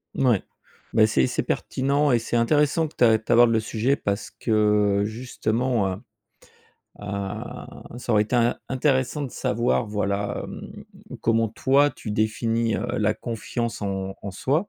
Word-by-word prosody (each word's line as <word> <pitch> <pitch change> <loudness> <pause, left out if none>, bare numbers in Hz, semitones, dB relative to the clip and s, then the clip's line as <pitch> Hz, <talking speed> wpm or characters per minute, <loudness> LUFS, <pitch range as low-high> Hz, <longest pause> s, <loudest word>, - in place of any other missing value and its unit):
Mouais, 125 -7 +3 0.5
bah, 110 - +6
c'est 70 -12 +2
c'est - - -1
pertinent 140 +2 0
et 120 - +4
c'est 115 - -3
intéressant 150 +6 +2
que - - -16
tu - - +1
a 110 -2 +6
que - - -23
tu - - -3
abordes 120 0 +6
le 110 - +3
sujet 115 +5 0
parce 100 -2 -3
que 105 -2 +2
justement, 115 -1 -1
heu, - - -4 1.0
a 100 +2 -6 0.2
ça 120 - -2
aurait 105 - +5
été 110 +4 -4
in 120 0 +2
intéressant 130 +1 0
de 135 - -4
savoir 120 +2 0
voilà, 100 -1 -2
hem, - - -9 0.4
comment 115 -1 +2
toi 140 +6 +3
tu 105 - -8
définis, 115 +2 0
heu, - - -3
la 105 0 +2
confiance 115 -1 -4
en 95 -1 -3
en 100 - -5
soi 150 - 0
115 Hz, 165 wpm, -24 LUFS, 105-125 Hz, 1.0 s, bah